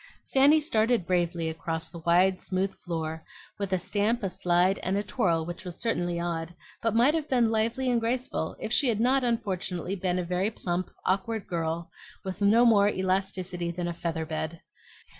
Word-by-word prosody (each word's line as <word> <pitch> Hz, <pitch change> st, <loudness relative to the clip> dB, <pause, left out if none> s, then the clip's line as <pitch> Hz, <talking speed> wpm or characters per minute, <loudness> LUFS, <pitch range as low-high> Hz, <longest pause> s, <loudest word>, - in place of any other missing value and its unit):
Fanny 280 Hz, +4 st, +6 dB
started 230 Hz, -, +1 dB
bravely 175 Hz, -2 st, 0 dB
across 160 Hz, 0 st, -3 dB
the 170 Hz, -, -8 dB
wide 180 Hz, +3 st, +3 dB
smooth 190 Hz, +1 st, -1 dB
floor, 160 Hz, -2 st, -4 dB, 0.4 s
with 200 Hz, -2 st, -3 dB
a 185 Hz, -, +3 dB
stamp, 210 Hz, +6 st, 0 dB
a 195 Hz, -, -1 dB
slide, 180 Hz, +2 st, +2 dB
and 190 Hz, +2 st, -1 dB
a 205 Hz, -, 0 dB
twirl 165 Hz, -5 st, 0 dB
which 175 Hz, +2 st, -6 dB
was 180 Hz, -2 st, -7 dB
certainly 175 Hz, -7 st, 0 dB
odd, 170 Hz, 0 st, -3 dB, 0.3 s
but 225 Hz, -1 st, 0 dB
might 245 Hz, +6 st, +5 dB
have 315 Hz, -2 st, -2 dB
been 240 Hz, -4 st, +3 dB
lively 230 Hz, +4 st, 0 dB
and 245 Hz, -2 st, +3 dB
graceful 235 Hz, -8 st, -2 dB
if 220 Hz, -, -3 dB
she 275 Hz, -, +3 dB
had 220 Hz, -3 st, 0 dB
not 260 Hz, +3 st, +3 dB
unfortunately 195 Hz, -6 st, -1 dB
been 180 Hz, -1 st, -1 dB
a 180 Hz, -, 0 dB
very 180 Hz, +3 st, 0 dB
plump, 180 Hz, -4 st, -3 dB, 0.2 s
awkward 200 Hz, +3 st, 0 dB
girl, 165 Hz, -1 st, -3 dB, 0.3 s
with 190 Hz, 0 st, -6 dB
no 220 Hz, +4 st, +5 dB
more 205 Hz, -3 st, +5 dB
elasticity 185 Hz, -2 st, -1 dB
than 175 Hz, 0 st, -3 dB
a 175 Hz, -, -2 dB
feather 165 Hz, -1 st, -3 dB
bed. 160 Hz, +1 st, -4 dB
185 Hz, 180 wpm, -28 LUFS, 170-225 Hz, 0.4 s, Fanny